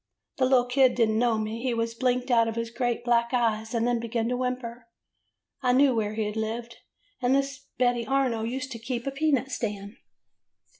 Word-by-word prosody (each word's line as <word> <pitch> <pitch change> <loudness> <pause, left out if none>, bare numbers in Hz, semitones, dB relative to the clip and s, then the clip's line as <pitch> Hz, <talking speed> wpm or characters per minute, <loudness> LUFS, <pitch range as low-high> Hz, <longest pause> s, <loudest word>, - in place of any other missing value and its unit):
"The 260 - +3
little 255 -1 +4
kid 255 0 +3
did 230 -2 +3
n't 220 - 0
know 235 -2 +2
me. 220 +1 -3
He 250 -1 -1 0.2
blinked 250 0 +1
out 230 -1 +4
of 225 - -3
his 230 0 -3
great 240 0 -2
black 235 +1 +2
eyes, 225 -1 0
and 230 0 +1
then 240 -1 +1
began 230 0 -2
to 250 - 0
whimper. 245 -2 -4 0.7
I 250 -2 +2
knew 270 +1 +5
where 215 -2 -1
he 220 -1 -1
had 210 0 -4
lived, 230 +2 -4 0.4
and 250 +1 +3
this 275 0 -2
Betty 245 -2 +1
Arno 265 -4 +1
used 255 +4 -4
to 230 - -6
keep 235 +1 -4
a 275 - -1
peanut 275 -2 0
stand. 205 -4 -4
240 Hz, 200 wpm, -27 LUFS, 230-255 Hz, 0.7 s, knew